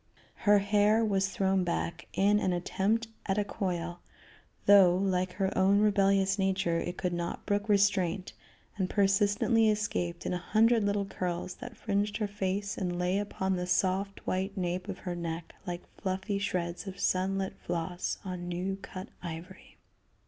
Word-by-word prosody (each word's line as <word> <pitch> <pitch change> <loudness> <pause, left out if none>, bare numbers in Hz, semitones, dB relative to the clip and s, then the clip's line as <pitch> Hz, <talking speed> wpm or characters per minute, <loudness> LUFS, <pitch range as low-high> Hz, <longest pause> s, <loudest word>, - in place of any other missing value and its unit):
Her 205 - +8
hair 205 +2 +3
was 195 -2 +1
thrown 190 -1 +1
back 170 -1 -3
in 205 +2 +3
an 185 -3 +1
attempt 200 +6 0 0.2
at 195 0 +1
a 210 - +3
coil, 175 -3 -3 0.7
though, 195 -3 +7
like 185 -1 0
her 190 0 -1
own 190 +2 +4
rebellious 195 -1 +3
nature, 190 -3 +1
it 175 +1 -4
could 180 -2 -1
not 170 0 -4
brook 205 +1 0
restraint, 195 -2 +2 0.4
and 185 -2 0
persistently 205 +3 +3
escaped 175 -5 -1
in - - -1
a 180 - -1
hundred 225 +4 +3
little 200 0 +1
curls 180 -1 -3
that 245 -2 -9
fringed 205 -1 -1
her 215 -2 -1
face 200 0 -2
and 180 -3 -2
lay 180 +2 +1
upon 190 -2 -1
the 180 0 -3
soft 190 +2 0
white 190 +2 -2
nape 180 +1 -2
of 195 -2 -4
her 180 - -5
neck 165 -1 -5
like 175 0 -4 0.2
fluffy 190 +1 -1
shreds 180 -1 -2
of 195 0 -7
sun 190 +1 +1
lit 195 0 -3
floss 175 +1 -3
on 180 -2 -5
new 185 +2 -2
cut 185 -1 -8
ivory. 175 +2 -9
190 Hz, 165 wpm, -30 LUFS, 180-205 Hz, 0.7 s, Her